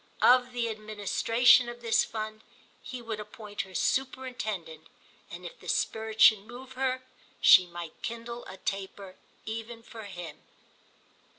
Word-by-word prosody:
Of 250 0 +6
the 240 -1 -1
administration 220 +3 +3
of 240 0 -9
this 230 -1 +3
fund 215 0 -5 0.4
he 250 -2 -7
would 225 -2 -4
appoint 210 -1 -6
her 190 -2 -11
superintendent, 220 -12 -2 0.4
and - - -9
if - - -9
the - - -13
spirit 220 0 -1
should 215 -2 +8
move 250 +2 -10
her 260 0 -1 0.4
she 180 - +8
might 170 -2 -7
kindle 235 +1 -5
a 190 - -9
taper 195 0 -5 0.3
even 225 +1 -6
for 225 -2 -10
him. 175 -4 -8
220 Hz, 135 wpm, -29 LUFS, 205-240 Hz, 0.4 s, should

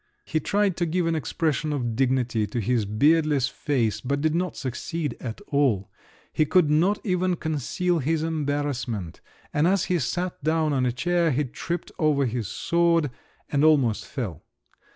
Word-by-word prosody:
He 160 - 0
tried 200 +3 +1
to 175 - 0
give 175 +2 0
an 165 - +1
expression 155 +1 -1
of 120 -6 -2
dignity 125 -4 +1
to 120 - -3
his 115 0 +1
beardless 145 +5 +3
face, 130 -7 -1
but 140 +2 -1
did 155 +1 +1
not 180 +1 -1
succeed 145 +4 -3
at 115 -3 -6
all: 130 -10 +1 0.4
he - - +3
could 155 0 +3
not 180 +7 +3
even 180 -2 +1
conceal 165 +3 -1
his 155 +3 0
embarrassment, 145 - -2 0.3
and 150 +3 +3
as 195 -1 +2
he 180 -1 0
sat 175 +4 -3
down 155 0 +1
on 130 -2 +1
a - - +1
chair, 170 +6 +1
he 145 +1 +1
tripped 170 +6 -5
over 150 -3 +3
his 120 -3 -2
sword, 170 +1 +1 0.4
and 145 0 +2
almost 140 -8 +3
fell. 110 - -5
150 Hz, 165 wpm, -25 LUFS, 125-165 Hz, 0.4 s, beardless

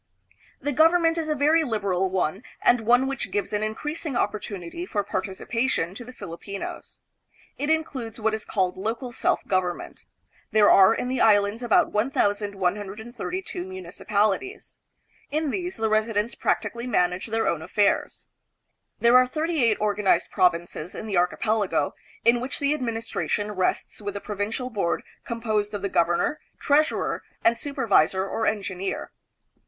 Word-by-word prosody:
The 290 - -2
government 330 +3 +4
is 315 -1 -3
a 305 - +1
very 305 +3 +4
lib 225 -8 -2
eral 190 -1 +1
one, 185 +1 -1 0.2
and 240 -1 +5
one 245 +4 +4
which 270 -2 -3
gives 205 +1 -2
an 210 - 0
increasing 295 +7 -3
opportunity 205 - -3
for 210 - -2
participation 195 0 -2
to 245 - -8
the 245 - -10
Filipinos. 200 -3 -7 0.6
It 290 - -1
includes 265 -8 -1
what 220 0 +1
is 220 -1 -2
called 185 -2 -1
local 230 +5 -3
self 230 - 0
government. 185 -2 -2 0.4
There 215 -1 +5
are 195 +3 +7
in - - -2
the 255 -1 -1
Islands 205 +1 +4
about 240 - +3
1,132 205 - -2
municipalities. 200 - -2 0.5
In 305 0 -1
these 360 +2 -3
the 220 - +1
residents 215 0 +1
prac - - +1
tically 235 +1 -5
manage 180 -3 +1
their 225 0 0
own 165 -2 0
affairs. 205 +5 0 0.7
There 235 +1 +7
are 255 0 +5
thirty 310 +1 0
eight 225 -3 +3
organized 210 -1 +1
provinces 175 -2 0
in - - -6
the 205 -4 -1
archipelago, 205 +4 +1 0.3
in 235 +1 +5
which 255 +2 -3
the 285 +1 +1
ad 300 - -4
ministration 225 -3 -2
rests 190 +2 -1
with 205 -1 -4
the - - -2
Provincial 215 +5 -3
Board 195 -6 -1 0.2
composed 215 -3 -1
of 205 - -5
the 200 - 0
governor, 175 - +2 0.2
treasurer, 300 +2 +1 0.2
and 230 - +5
supervisor 205 - +2
or 225 - -1
engineer. 195 -3 -2
215 Hz, 150 wpm, -25 LUFS, 195-250 Hz, 0.7 s, are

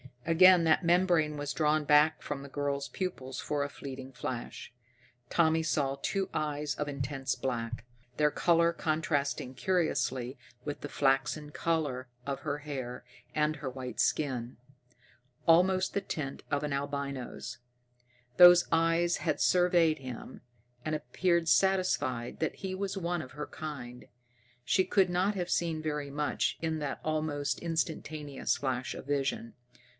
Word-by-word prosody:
Again 175 +1 +7
that 160 +3 +3
membrane 170 -3 +3
was 145 0 -3
drawn 155 -1 +2
back 150 +1 +4
from 145 -1 -4
the 140 - -9
girl's 140 0 -2
pupils 135 -9 -4
for 145 -1 -1
a 140 - -3
fleeting 135 -2 -8
flash. 125 -1 -5 0.6
Tommy 160 -1 +3
saw 145 -4 0
two 195 -1 -1
eyes 150 -1 -1
of 150 - -3
intense 135 -1 -2
black, 120 -2 -3 0.3
their 150 -1 +3
color 170 +1 +3
contrasting 155 -5 -1
curiously 130 -6 0 0.3
with 145 -1 -5
the 145 - -5
flaxen 140 +2 +1
color 145 -6 -1 0.2
of 140 -1 -3
her 150 -1 -2
hair 130 -4 -6 0.3
and 155 0 +1
her 135 -2 -4
white 130 -1 -7
skin, 125 -5 0 0.9
almost 185 +3 +4
the 200 - 0
tint 150 -7 -5
of 145 +1 0
an 145 -1 -2
albino's. 140 -2 -4 0.8
Those 175 0 +9
eyes 165 +1 +3
had - - -1
surveyed 175 -3 +4
him, 130 -1 -8 0.4
and 155 0 0
appeared 170 +1 0
satisfied 175 -10 +1
that 160 - -1
he 190 -1 -4
was 195 +1 -3
one 175 -2 -1
of 130 - -10
her 150 0 -5
kind. 125 -6 -7 0.6
She 190 - +3
could 195 -3 +3
not 185 +4 +1
have 180 -2 -2
seen 165 -3 0
very 150 -2 -3
much 145 +1 -1
in 160 -1 -1
that 145 -2 -4
almost 155 -2 -1
instantaneous 155 -3 -2
flash 130 -2 -2
of - - -8
vision. 135 -4 -1
150 Hz, 140 wpm, -31 LUFS, 135-165 Hz, 0.9 s, Those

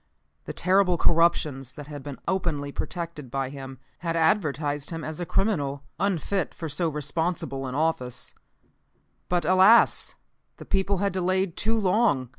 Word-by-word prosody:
The - - -4
terrible 185 -1 +3
corruptions 150 -6 +2
that 145 - -9
had 145 -1 -8
been 140 -1 -7
openly 165 -7 -1
protected 165 -4 -5
by 135 +1 -2
him, 135 -1 -8 0.2
had 165 -1 -2
advertised 150 -4 +1
him 165 -1 -5
as 160 +3 -4
criminally 145 -9 0 0.2
unfit 195 -1 -1
for 165 - -5
so 160 +3 0
responsible 150 -3 -2
an 130 - -5
office. 145 -5 -1 1.0
But, 175 -3 +1
alas! 190 +6 +5 0.4
the - - -10
people 195 0 +1
had 200 0 0
delayed 185 0 0
too 225 +2 +1
long. 190 - +2
165 Hz, 140 wpm, -26 LUFS, 145-185 Hz, 1.0 s, alas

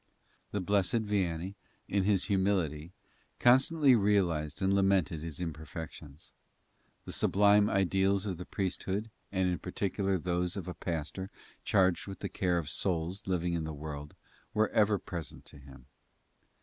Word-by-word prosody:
The 100 - -2
Blessed 100 +3 +1
Vianney, 95 -3 -1 0.3
in 100 -1 +1
his 100 -3 +3
humility, 95 -6 0 0.5
constantly 135 +2 +5
realized 90 -8 +1
and 95 0 +2
lamented 95 -5 +2
his 80 -1 -5
imperfections. 80 -2 -7 0.7
The - - -6
sublime 105 +1 +4
ideals 95 0 +2
of 95 -4 -3
the 90 - -7
priesthood 100 +2 -2 0.2
and 95 -2 +1
in 90 -3 -1
particular 100 +1 -1
those 90 +1 -1
of 95 -2 -5
a 90 - -4
pastor 85 +3 -4 0.3
charged 95 -3 +2
with 95 - -6
the - - -3
care 90 -2 0
of 85 -4 -2
souls 90 +4 -2
living 90 -2 0
in 85 -1 -1
the 80 -1 -5
world, 75 0 -7 0.4
were 110 0 +3
ever 105 -1 +3
present 85 -5 -7
to - - -12
him. 70 -2 -14
95 Hz, 145 wpm, -31 LUFS, 80-100 Hz, 0.7 s, constantly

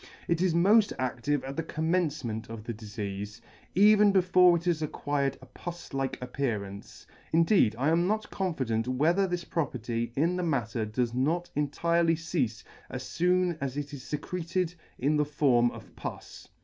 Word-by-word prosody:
It 170 0 +1
is 180 -3 +2
mod 205 +5 +5
adtive 130 +2 -1
at 135 - -5
the - - +1
commencement 155 -9 -1
of 115 -2 -7
the 115 - -4
difeafe, 105 -1 -6 0.4
even 210 +1 +6
before 180 -2 +5
it 165 - -7
has 170 -3 +1
acquired 145 -2 -1
a - - -10
pus 175 +7 -9
like 135 -1 -1
appearance; 110 -7 -4 0.3
indeed 165 - +4
I 135 +5 +2
am 170 +2 +3
not 215 +2 -1
confident 130 - -1
whether 160 +10 +2
this 175 -1 -2
property 120 -8 -2
in 170 +6 +1
the - - -1
mat 135 -10 0
ter 115 -2 -1
does 115 +2 -1
not 160 +8 0
entirely 165 +3 +2
ceafe 150 -9 -2 0.3
as 130 -1 -7
foon 180 -1 +2
as 140 0 -3
it 145 0 -4
is 140 - -7
fecreted 175 +3 -2 0.2
in 145 +4 +1
the 150 - +2
form 135 -5 +3
of - - -12
pus. - - -8
145 Hz, 165 wpm, -29 LUFS, 125-175 Hz, 0.4 s, even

